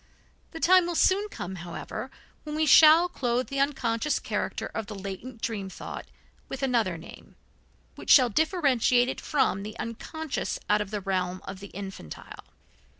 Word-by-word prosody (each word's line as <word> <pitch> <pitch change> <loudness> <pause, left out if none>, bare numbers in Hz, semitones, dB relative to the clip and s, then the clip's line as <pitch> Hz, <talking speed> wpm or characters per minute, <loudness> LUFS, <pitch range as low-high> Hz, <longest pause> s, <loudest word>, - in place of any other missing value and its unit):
The 325 - -8
time 365 +1 +5
will 350 - -3
soon 400 +5 +3
come, 190 - -6
however, 170 0 -6 0.3
when 300 -1 -5
we 310 0 +2
shall 315 +4 +8
clothe 250 -7 -1
the 275 -1 -2
unconscious 270 -1 0
character - - -3
of 220 - -5
the 210 - -7
latent 200 +5 -8
dream 200 -4 -3
thought - - -8 0.4
with 270 0 -5
another 230 -9 +1
name, 165 - -13 0.6
which - - -10
shall 255 -3 +8
differentiate 255 - +2
it - - -4
from 270 -10 +1
the 215 +2 -7
unconscious 305 +6 -4
out 210 0 +3
of 205 - -4
the 210 -1 -4
realm 185 -1 -1
of 190 -1 -7
the 200 - -9
infantile. 190 - -9
240 Hz, 160 wpm, -27 LUFS, 195-300 Hz, 0.6 s, shall